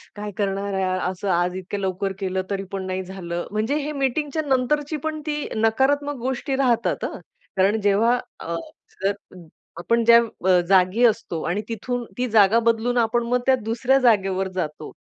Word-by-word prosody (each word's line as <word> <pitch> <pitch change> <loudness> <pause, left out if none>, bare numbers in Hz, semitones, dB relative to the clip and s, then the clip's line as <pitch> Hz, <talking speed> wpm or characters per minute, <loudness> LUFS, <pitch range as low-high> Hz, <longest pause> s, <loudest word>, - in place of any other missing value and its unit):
काय 210 0 -5
करणार 200 0 -1
आहे 190 0 0 0.3
असं, 185 +2 -5
आज 175 0 +1
इतक्या 190 +2 -5
लवकर 195 0 -2
केलं 190 -1 -1
तरीपण 195 -1 -4
नाही 185 0 -3
झालं. 175 -2 -5
म्हणजे 215 +6 0
हे 300 0 -3
मीटिंगच्या 285 +2 -1
नंतरची 290 +3 0
पण 310 -1 -3
ती 300 -1 -2
नकारात्मक 270 +7 +1
गोष्टी 265 +2 -2
राहतात. 235 -8 +1
हं, - - -5 0.4
कारण 200 +4 +3
जेव्हा 210 +4 +3 0.2
अ, 170 - -4 0.5
जर 200 - +2 0.6
आपण 230 +7 +1
ज्या 235 0 +8 0.3
अ, 185 -1 +6
जागी 190 +5 +4
असतो 220 -8 0
आणि 190 +4 -1
तिथून 240 +2 -3
ती 250 0 0
जागा 215 0 +5
बदलून 230 +2 0
आपण 235 0 +2
मग 250 +1 +2
त्या 265 - +5
दुसऱ्या 245 +4 +2
जागेवर 195 -6 +2
जातो. 155 -4 -4
220 Hz, 165 wpm, -23 LUFS, 190-250 Hz, 0.6 s, ज्या